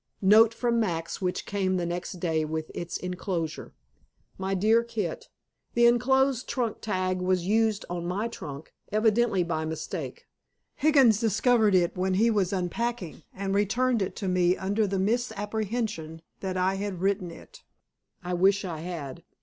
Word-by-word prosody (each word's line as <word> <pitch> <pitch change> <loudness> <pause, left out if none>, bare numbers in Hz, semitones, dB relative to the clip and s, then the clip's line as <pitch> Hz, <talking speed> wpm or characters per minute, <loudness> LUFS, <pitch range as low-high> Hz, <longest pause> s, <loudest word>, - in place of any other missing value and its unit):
NOTE 215 +3 +7
FROM 235 0 0
MAX 165 -6 -2
WHICH 180 -1 -2
CAME 190 -2 0
THE 175 - -1
NEXT 175 +3 -4
DAY 165 -3 -1
WITH 155 0 -4
ITS 170 -1 -4
ENCLOSURE. 180 -3 -3 0.7
My 190 +1 -1
Dear 220 +5 +3
Kit 215 -8 -4 0.5
The 235 0 +5
enclosed 255 +2 +3
trunk 240 -4 -2
tag 185 -3 -1
was 180 -1 +1
used 220 +1 +1
on 175 -1 -4
my 200 +6 -1
trunk, 145 -10 -8 0.2
evidently 215 -2 +2
by 165 -2 -2
mistake. 160 0 -5 0.5
Higgins 270 -8 +4
discovered 225 -1 +3
it 175 -1 +2
when 185 0 0
he 230 +4 +3
was 200 -4 +1
unpacking 195 +1 -3
and 195 0 -3
returned 230 +4 +1
it 190 - -2
to 195 - -4
me 180 0 +2
under 205 +3 0
the 195 0 -1
misapprehension 210 -5 -2 0.2
that 185 -1 -3
I 190 +1 +1
had 195 -3 -4
written 195 -2 0
it. 165 - -13 0.6
I 180 0 -3
wish 195 +3 +3
I 165 -4 -4
had. 160 -6 -6
195 Hz, 155 wpm, -27 LUFS, 180-225 Hz, 0.7 s, NOTE